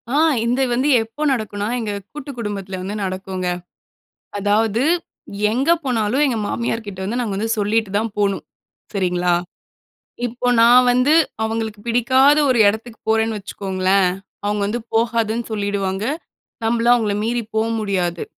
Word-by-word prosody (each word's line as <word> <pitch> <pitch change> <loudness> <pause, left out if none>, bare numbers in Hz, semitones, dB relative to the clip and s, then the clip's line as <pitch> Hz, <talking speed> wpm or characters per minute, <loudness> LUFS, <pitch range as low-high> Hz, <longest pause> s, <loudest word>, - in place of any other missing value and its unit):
ஆ, - - +3 0.3
இது 250 +3 +1
வந்து 260 +4 +1
எப்போ 225 +7 -12
நடக்கும்னா? 210 -4 -2
எங்க 215 -3 -3 0.2
கூட்டு 290 -1 -7
குடும்பத்தில 200 -4 -4
வந்து 200 +3 -4
நடக்குங்க. 185 -1 -3 0.9
அதாவது, 215 +3 +1 0.7
எங்க 270 +8 +1
போனாலும் 245 +2 +1
எங்க 245 -5 0
மாமியார்க்கிட்ட 220 -4 -3
வந்து, 230 +6 -2
நாங்க 210 -5 -2
வந்து 220 +3 -1
சொல்லிட்டு 210 0 +1
தான் 220 -1 -2
போணும். 200 -1 0 0.5
சரிங்களா? 180 -2 +1 0.9
இப்போ 245 +1 -4
நான் 245 +2 +7
வந்து 250 +4 +3 0.3
அவங்களுக்கு, 220 -1 -3
பிடிக்காத 260 +5 +4
ஒரு 245 -3 +3
எடத்துக்கு 220 +3 -2
போறேன்னு 225 -1 +2
வச்சுக்கோங்களேன். 190 -1 0 0.4
அவங்க 205 0 0
வந்து, 230 +4 -2
"போகாதன்னு 230 0 +1
சொல்லிடுவாங்க." 200 -1 -2 0.6
நம்பளும் 235 +1 +3
அவங்கள 215 -4 0
மீறி 235 +1 0
போக 220 +1 +2
முடியாது. 180 -5 -1
220 Hz, 130 wpm, -20 LUFS, 200-235 Hz, 0.9 s, நான்